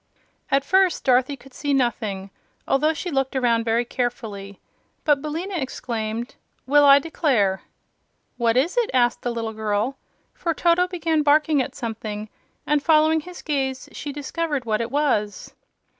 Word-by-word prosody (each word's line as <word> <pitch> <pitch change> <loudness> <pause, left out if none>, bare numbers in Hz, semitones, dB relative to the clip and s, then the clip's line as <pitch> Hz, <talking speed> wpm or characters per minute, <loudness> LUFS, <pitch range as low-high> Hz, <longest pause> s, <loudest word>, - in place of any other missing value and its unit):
At 275 0 +2
first, 375 0 +3
Dorothy 260 +2 +2
could 265 +1 -17
see 285 +1 -1
nothing, 215 -6 -1 0.4
although 300 +3 +3
she 330 +3 -5
looked 270 -1 -1
around 235 -3 +2
very 230 +1 +1
carefully. 220 -6 -4 0.4
But 295 -3 +3
Billina 325 +6 -4
exclaimed: 235 -4 -4 0.3
"Well, 290 +2 +5
I 280 0 +9
declare!" 265 - +1 0.7
"What 235 0 +1
is 310 - +2
it?" 475 -2 +2
asked 240 -1 +2
the 245 - -2
little 230 -2 -3
girl: 220 +4 -2 0.3
for 335 -2 -2
Toto 345 +2 +3
began 330 -3 0
barking 300 0 +3
at - - -5
something, 220 -3 -5 0.4
and 295 -1 +2
following 315 0 +4
his 355 +3 -10
gaze 265 -3 -2
she 290 - -6
discovered 290 -1 -3
what 215 0 0
it 230 - -3
was. 240 -8 -1
270 Hz, 150 wpm, -23 LUFS, 230-300 Hz, 0.7 s, I